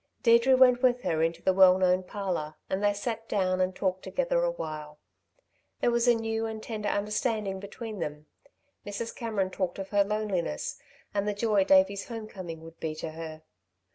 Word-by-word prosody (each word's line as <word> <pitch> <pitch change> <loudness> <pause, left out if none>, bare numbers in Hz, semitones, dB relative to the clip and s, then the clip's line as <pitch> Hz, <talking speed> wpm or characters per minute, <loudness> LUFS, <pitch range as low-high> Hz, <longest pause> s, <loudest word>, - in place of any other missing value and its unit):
Deirdre 235 +2 +6
went 250 -1 +6
with 250 -1 +3
her 160 -1 0
into 165 +1 0
the 190 - +3
well 185 -1 +7
known 185 0 +3
parlour, 180 -5 -4 0.2
and 190 +2 -1
they 205 - +4
sat 225 +2 -4
down 185 -2 +1
and 185 0 0
talked 185 -1 -1
together - - 0
awhile. 155 - -4 0.8
There 240 - +2
was 235 +1 +2
a 240 - +6
new 225 0 -2
and 220 -1 -6
tender 210 -2 -3
understanding 210 -1 -1
between 215 +1 -7
them. 150 -2 -5 0.6
Mrs. 205 +3 -5
Cameron 215 -6 -2
talked 185 -2 -2
of 195 -1 -6
her 205 -1 +4
loneliness 200 - -2 0.3
and 205 0 0
the 210 - 0
joy 205 -2 +2
Davey's 190 +1 +4
home 225 -2 -6
coming 175 -6 -8
would 165 0 -13
be 155 -1 -3
to 155 0 -5
her. 160 -1 -8
200 Hz, 180 wpm, -28 LUFS, 185-225 Hz, 0.8 s, well